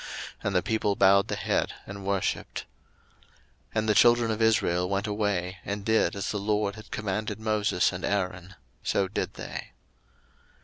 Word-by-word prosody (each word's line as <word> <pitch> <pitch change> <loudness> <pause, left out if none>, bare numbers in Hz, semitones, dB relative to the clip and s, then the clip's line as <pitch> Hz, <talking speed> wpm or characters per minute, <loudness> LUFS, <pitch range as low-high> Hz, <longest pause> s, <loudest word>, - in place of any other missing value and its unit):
And 100 - -1
the 90 - +3
people 110 -2 +1
bowed 100 +1 +5
the - - -2
head - - 0
and 100 0 -8
worshipped. 100 -1 -2 1.0
02:012:028 - - -39
And 110 0 +1
the 105 - +4
children 120 +1 +5
of 110 +1 -2
Israel 90 -5 +2
went 100 +1 0
away, 100 -4 -1
and 100 0 -4
did 110 -1 +2
as 100 - -2
the 105 - -2
LORD 105 0 0
had 110 - -12
commanded 105 +1 -3
Moses 105 -4 +1
and 90 - -6
Aaron, 90 -2 -2 0.3
so 95 - +1
did 95 - -3
they. - - -7
100 Hz, 165 wpm, -27 LUFS, 95-110 Hz, 1.0 s, bowed